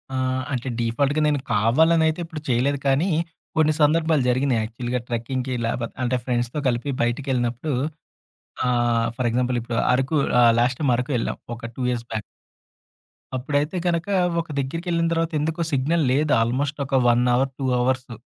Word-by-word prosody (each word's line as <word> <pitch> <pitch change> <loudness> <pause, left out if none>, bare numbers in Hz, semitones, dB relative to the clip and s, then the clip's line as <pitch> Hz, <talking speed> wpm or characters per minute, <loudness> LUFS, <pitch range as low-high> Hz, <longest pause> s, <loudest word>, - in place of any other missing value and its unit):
ఆ! - - -1 0.4
అంటే 125 0 -3
డిఫాల్ట్‌గా 140 +6 +1
నేను 145 -1 +1
కావాలని 160 +10 +4
అయితే 160 +2 -1
ఇప్పుడు 160 -2 -8
చేయలేదు 130 +4 +1
కానీ 140 +8 +2 0.5
కొన్ని 155 -1 +4
సందర్భాలు 155 -1 +3
జరిగినియి 130 -1 +2
యాక్చువల్‌గా 120 +3 -3
ట్రెక్కింగ్‌కి 125 +2 -3
లేపోతే 115 0 -3
అంటే 125 +1 +1
ఫ్రెండ్స్‌తో 120 +2 -1
కలిపి 125 +3 -1
బయటకి 120 +4 -2
ఎళ్ళినప్పుడు 125 +4 -1 0.9
ఆహ్, 120 -2 +2
ఫర్ 125 -2 -1
ఎగ్జాంపుల్ 125 +1 0
ఇప్పుడు 120 0 -4 0.2
అరకు 135 +4 +1 0.2
ఆహ్, 120 -1 +6
లాస్ట్ 125 +1 +1
టైమ్ 140 -5 +2
అరకు 125 +3 -3
వెళ్ళాం 115 - -2 0.2
ఒక 115 0 -7
2 125 -2 -2
బాక్. 110 - -2 1.2
అప్పుడైతే 145 +6 -1
గనుక 170 0 0 0.3
ఒక 165 - -12
దగ్గరికి 165 +7 -4
ఎళ్ళిన 170 0 +1
తర్వాత 165 0 0
ఎందుకొ 160 +3 -1
సిగ్నల్ 150 +4 +1
లేదు 145 +3 +1
ఆల్మోస్ట్ 135 +6 -1
ఒక 135 -1 +2
1 120 +1 +3
హౌర్ 130 +2 +1
2 135 - -3
హౌర్సు. 125 0 -1
130 Hz, 155 wpm, -23 LUFS, 120-150 Hz, 1.2 s, ఆహ్